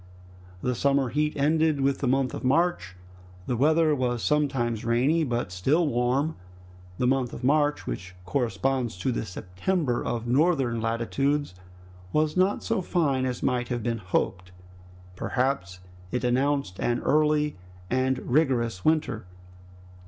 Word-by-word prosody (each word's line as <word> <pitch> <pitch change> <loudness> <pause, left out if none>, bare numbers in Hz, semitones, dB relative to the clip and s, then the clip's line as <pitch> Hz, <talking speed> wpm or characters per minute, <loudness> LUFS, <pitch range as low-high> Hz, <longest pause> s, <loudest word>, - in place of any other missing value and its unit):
The 125 - +1
summer 140 +1 +1
heat 150 +3 -1
ended 155 +1 +2
with 135 0 +1
the 135 - -1
month 130 0 +1
of - - -6
March. 135 - +1 0.5
The 125 - -1
weather 155 +4 +3
was 125 -4 -1
sometimes 135 -7 0
rainy, 130 +8 +2
but 120 -8 -2
still 140 - +1
warm. 130 +5 0 0.6
The 125 - 0
month 130 -1 +1
of - - -8
March, 145 +2 +2
which 90 +9 -6
corresponds 125 -2 -1
to 90 +8 -1
the - - -2
September 120 - -2
of 115 -1 -3
northern 130 -3 +2
latitudes, 120 +3 0 0.6
was 155 0 +1
not 185 +2 +2
so - - 0
fine 140 -8 +1
as 125 -1 -4
might 125 -1 0
have 120 -2 -3
been 115 -1 -1
hoped. 90 -1 -2 0.6
Perhaps 125 -6 -2 0.3
it 125 - -2
announced 130 -4 0
an 120 0 0
early 150 -2 +2 0.3
and 130 +1 +1
rigorous 120 - +1
winter. 150 - 0
130 Hz, 140 wpm, -26 LUFS, 120-150 Hz, 0.6 s, weather